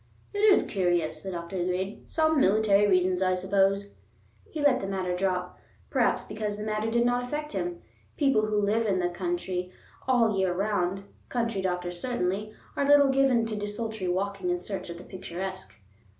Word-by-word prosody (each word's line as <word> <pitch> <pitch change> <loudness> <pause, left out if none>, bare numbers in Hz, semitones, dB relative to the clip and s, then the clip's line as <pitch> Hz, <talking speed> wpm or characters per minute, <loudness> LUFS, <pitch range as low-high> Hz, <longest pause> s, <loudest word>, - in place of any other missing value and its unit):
"It 410 - -3
is 415 -1 +5
curious," 175 -5 0
the 195 - -6
doctor 170 +1 -5
agreed. 185 +3 -3
"Some 315 -2 +2
military 205 0 +4
reasons, 185 -1 +2
I 185 -1 +3
suppose." 195 +2 +1 0.6
He 315 - -6
let 285 -3 +4
the 195 - -4
matter 185 -2 -2
drop, 180 -1 -2 0.3
perhaps - - +2
because 210 -1 -4
the 210 - -5
matter 215 +1 -1
did 235 +1 +2
not 245 0 +1
affect 300 +4 -4
him. 345 0 -3 0.3
People 270 -7 +3
who 215 0 0
live 215 +2 +1
in 195 -2 +2
the 175 -1 +1
country 180 0 -3 0.4
all 235 -4 +3
the 195 - -1
year 185 -2 +1
round, 195 -1 0 0.3
country 230 -5 -1
doctors 180 -1 -2
certainly, 210 -4 -1 0.2
are 280 - 0
little 285 -1 +6
given 265 -4 +3
to 225 -1 -3
desultory 210 -1 -4
walking 190 +1 -1
in 175 - +1
search 185 0 -6
of 170 - -6
the 175 - -10
picturesque. 185 +1 -6
200 Hz, 180 wpm, -28 LUFS, 185-230 Hz, 0.6 s, little